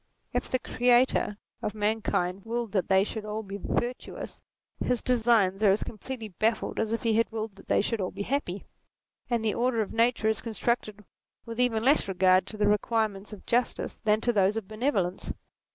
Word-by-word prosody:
If - - -1
the 255 - +2
Creator 245 -3 +2 0.2
of 210 - -3
man 215 +1 0
kind 180 0 -1
willed 230 -1 -3
that 190 -4 0
they 190 0 +5
should 215 +1 -4
all 215 +1 -4
be 200 0 -7
virtuous, 245 +1 -4 0.4
his 250 -1 0
designs 225 -6 +3
are 210 - +5
as 195 +2 +3
completely 225 0 -7
baffled 220 +4 -1
as 220 -1 0
if 230 - -2
he 230 -1 +2
had 230 +1 +2
willed 220 -2 -4
that - - -15
they - - +3
should 220 +1 -1
all 185 - -1
be 200 - -5
happy: 205 -7 -2 0.6
and 235 -2 0
the 215 - +2
order 245 -1 +1
of 215 - -1
nature 230 -1 +2
is 220 - +1
constructed 215 -2 -2 0.4
with 230 0 -7
even 230 -3 +2
less 280 -4 +4
regard 185 0 +3
to 215 - -8
the 210 - +2
requirements 210 -1 0
of 210 - -10
justice 245 +1 0
than 215 0 +3
to 240 - +1
those 200 +1 +3
of 215 -4 -4
benevolence. 215 -5 -1
220 Hz, 195 wpm, -28 LUFS, 200-235 Hz, 0.6 s, they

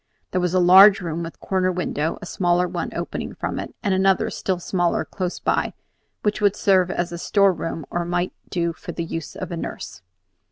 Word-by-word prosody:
There 185 - 0
was 180 0 0
a - - +5
large 190 +3 +8
room 170 -2 -4
with 165 0 -7
corner 185 -1 0
windows, 165 -3 -2
a - - -5
smaller 180 0 +1
one - - -3
opening - - -4
from - - -3
it, - - -7
and 200 -3 +1
another, 190 0 +2
still 190 -2 -2
smaller, 175 -2 0
close 180 +4 -4
by, - - 0 0.5
which 210 0 0
would 205 -1 +3
serve 185 -3 +3
as 175 -1 -2
a 170 - -5
storeroom 180 -6 +1
or 175 - -1
might 175 +1 -1 0.2
do 170 -2 -1
for 175 +1 -8
the 170 - -3
use 165 -1 -6
of 185 -2 -6
a 170 - -3
nurse. - - -6
180 Hz, 200 wpm, -23 LUFS, 170-190 Hz, 0.5 s, large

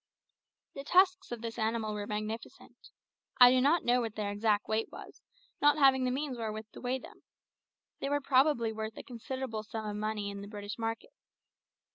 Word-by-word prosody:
The 275 - -7
tusks 370 +3 +3
of 235 -1 -5
this 230 +1 -5
animal 220 -1 -1
were 205 -1 -4
magnificent. 215 +2 -6 0.5
I 245 0 +10
do 255 0 +4
not 300 +5 +3
know 245 +1 +3
what 225 -2 -4
their 205 -1 -2
exact 205 0 +1
weight 220 +1 -1
was, - - -11 0.4
not 290 +1 +5
having 265 -3 +5
the - - +1
means 265 -2 -3
wherewith 220 -1 -5
to - - -11
weigh 250 +1 -1
them. 260 - -14 0.8
They 275 - -2
were 290 0 +1
probably 265 -4 +2
worth 220 0 -5
a - - -7
considerable 250 -1 -5
sum 220 0 -6
of 205 - -4
money 210 -1 -2
in 200 0 -7
the 200 - -8
British 205 +1 -7
market. 225 - -3
230 Hz, 185 wpm, -31 LUFS, 215-265 Hz, 0.8 s, I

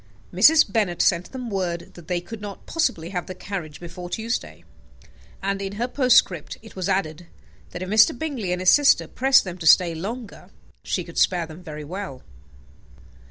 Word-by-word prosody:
Mrs. 320 0 +6
Bennet 200 -6 0
sent 175 -1 +2
them 250 -3 -6
word 175 -3 -3
that 175 -2 -14
they 180 -1 0
could 220 +4 -9
not 205 -2 -8
possibly 175 - -1
have 180 -2 -4
the 185 - -7
carriage 180 -6 -6
before 175 +1 -8
Tuesday; 230 +4 -4 0.8
and 195 0 -1
in 195 0 -4
her 235 +4 -2
postscript 250 - +2
it 220 - -14
was 185 0 -3
added, 175 -3 -2 0.4
that 180 - -6
if - - -6
Mr. 220 +4 +4
Bingley 250 - -3
and 180 0 -1
his 185 - +6
sister 290 -1 +4
pressed 265 +1 +4
them 180 -1 -7
to 160 - -2
stay 170 +1 +6
longer, 210 +7 -7 0.3
she - - -2
could - - -5
spare 175 -2 +2
them 160 +2 -12
very 150 -3 -8
well. 170 -4 -7
185 Hz, 180 wpm, -23 LUFS, 175-220 Hz, 0.8 s, Mrs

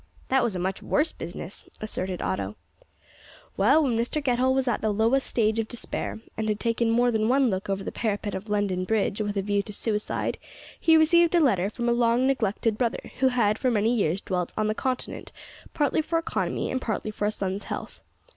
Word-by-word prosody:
"That 265 -1 +3
was 230 -5 -1
a - - -1
much 185 +2 -2
worse 310 +2 +1
business," 175 +2 -8
asserted 185 -4 -4
Otto. 95 +2 -2 1.0
"Well, 270 +11 +4
when 255 -5 +1
Mr 235 +6 0
Getall 260 -2 +2
was 265 -1 +1
at 240 - 0
the 220 - +1
lowest 225 +6 +2
stage 220 -1 +1
of 225 - -1
despair, 240 -2 -4 0.2
and 220 0 -2
had 210 0 0
taken 230 0 +1
more 240 +2 +3
than 220 0 +1
one 260 -2 +3
look 190 +1 -3
over 195 0 -1
the - - -4
parapet 205 -2 -2
of 195 +3 -6
London 200 -3 0
Bridge 210 +1 0
with 205 -1 -2
a 195 - 0
view 205 0 +1
to 210 - -9
suicide, 210 0 -2 0.4
he 325 -1 +5
received 340 +2 +5
a - - +6
letter 200 - +3
from 240 +2 -3
a - - +3
long 235 +1 +3
neglected 225 -4 0
brother, 240 -2 -1
who 265 - +4
had 220 -4 +2
for 255 - +2
many 225 +1 +2
years 190 -3 +1
dwelt 180 -2 -2
on 215 - +1
the 215 - +1
Continent, 255 +3 -3 0.4
partly 295 +1 +2
for 330 +2 -1
economy 330 - -2
and 260 - -1
partly 215 -2 -2
for 210 0 -1
a - - +1
son's 195 -1 -3
health. - - -6
220 Hz, 210 wpm, -26 LUFS, 205-255 Hz, 1.0 s, a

